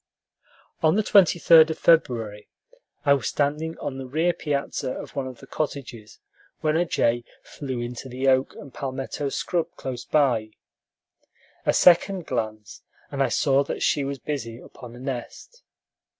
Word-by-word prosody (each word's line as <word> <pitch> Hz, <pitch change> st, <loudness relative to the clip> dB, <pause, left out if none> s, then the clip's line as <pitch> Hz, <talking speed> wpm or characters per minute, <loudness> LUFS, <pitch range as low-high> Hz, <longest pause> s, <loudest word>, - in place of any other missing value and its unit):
On 160 Hz, +1 st, +4 dB
the 215 Hz, -, +2 dB
23d 170 Hz, -5 st, +6 dB
of 160 Hz, -, -3 dB
February 115 Hz, -10 st, +2 dB, 0.6 s
I 140 Hz, -, +6 dB
was 140 Hz, -, -1 dB
standing 150 Hz, +3 st, -1 dB
on 135 Hz, -1 st, -5 dB
the 130 Hz, -, -6 dB
rear 160 Hz, +6 st, +1 dB
piazza 140 Hz, -4 st, -2 dB
of -, -, -9 dB
one 135 Hz, -2 st, -2 dB
of 130 Hz, -2 st, -10 dB
the -, -, -11 dB
cottages, 130 Hz, -7 st, -5 dB, 0.4 s
when 155 Hz, -1 st, +1 dB
a 175 Hz, +2 st, +2 dB
jay 120 Hz, -5 st, +1 dB, 0.2 s
flew 130 Hz, -4 st, -6 dB
into 120 Hz, +2 st, -6 dB
the 130 Hz, +2 st, -2 dB
oak 130 Hz, 0 st, +3 dB
and 140 Hz, -3 st, -11 dB
palmetto 135 Hz, +1 st, -4 dB
scrub 170 Hz, +4 st, -1 dB
close 125 Hz, -2 st, -5 dB
by. 120 Hz, -8 st, +1 dB, 1.1 s
A -, -, +4 dB
second 180 Hz, 0 st, +4 dB
glance, 110 Hz, -1 st, -4 dB, 0.3 s
and -, -, -2 dB
I -, -, +3 dB
saw 140 Hz, +1 st, +2 dB
that -, -, -4 dB
she 145 Hz, -, +2 dB
was 140 Hz, 0 st, -3 dB
busy 125 Hz, -6 st, -5 dB
upon 125 Hz, -1 st, -12 dB
a -, -, -11 dB
nest. 135 Hz, -, -7 dB
140 Hz, 155 wpm, -24 LUFS, 125-155 Hz, 1.1 s, 23d